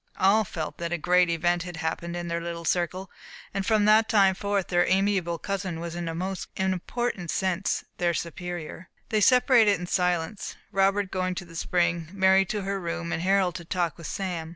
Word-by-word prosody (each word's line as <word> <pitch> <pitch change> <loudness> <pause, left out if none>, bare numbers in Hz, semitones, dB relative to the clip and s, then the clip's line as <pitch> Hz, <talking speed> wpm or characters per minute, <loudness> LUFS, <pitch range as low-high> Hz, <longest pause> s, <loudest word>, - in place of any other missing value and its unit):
All 200 +4 +4
felt 160 -5 -6
that 170 0 -3
a 175 - 0
great 180 +2 +3
event 175 +1 +1
had 175 -1 -7
happened 170 +1 -3
in 175 0 -4
their 170 0 -2
little 170 0 -5
circle; 180 +2 -1 0.4
and 195 0 -1
that - - -8
from 215 -2 +3
that 215 +1 +5
time 195 -4 +5
forth 200 0 -1
their 175 -1 +3
amiable 190 -3 +1
cousin 190 -4 -3
was 170 0 -5
in 175 0 -4
a 165 - -4
most 185 +2 -4
important 190 +1 -2
sense 190 +2 0 0.2
their 175 -1 +1
superior. 175 +1 -6 0.2
They 215 -2 +1
separated 235 -5 +5
in 180 - -4
silence, 180 +1 -1 0.2
Robert 195 0 +2
going 185 -1 -1
to 180 - -5
the 165 -1 -14
spring, 170 -1 0
Mary 190 0 +4
to 205 +1 -3
her 195 0 -2
room, 170 -1 -4
and 165 -1 -1
Harold 190 -1 +2
to - - -10
talk 170 -2 -2
with 165 - -7
Sam. 175 -5 -4
180 Hz, 200 wpm, -26 LUFS, 170-195 Hz, 0.4 s, that